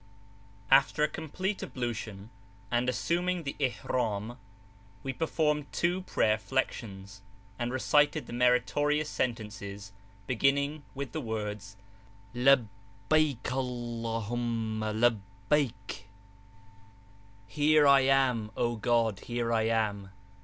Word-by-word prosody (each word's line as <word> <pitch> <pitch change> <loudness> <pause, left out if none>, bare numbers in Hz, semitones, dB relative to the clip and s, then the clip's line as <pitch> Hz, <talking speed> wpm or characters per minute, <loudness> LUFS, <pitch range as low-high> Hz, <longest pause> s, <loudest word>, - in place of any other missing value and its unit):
After 140 +2 +5
a - - +5
complete 180 +6 -4
ablution 110 -4 -5 0.4
and 120 +1 +1
assuming 175 +7 0
the 140 - -4
ihram, 120 -2 -2 0.6
we 135 - -3
performed 150 -1 0
two 175 +2 0
prayer 110 -11 +1
flections, 100 -6 -3 0.4
and 120 0 -1
recited 145 +2 +2
the - - -9
meritorious 125 +5 +2
sentences 100 -4 -4 0.3
beginning 140 +6 +1
with 135 -3 -5
the 155 - -3
words 105 -4 -5 0.6
Labbaik 120 +2 +1
Allah 120 -3 -3
huma 115 -2 -2 0.6
labbaik! 110 -9 0 1.4
Here 150 +6 +3
I 140 -1 +7
am, 130 -5 +2
O 120 -1 0
God, 115 -3 +1
here 120 -1 -2
I 110 -1 +2
am! 105 -4 0
120 Hz, 100 wpm, -30 LUFS, 110-140 Hz, 1.4 s, I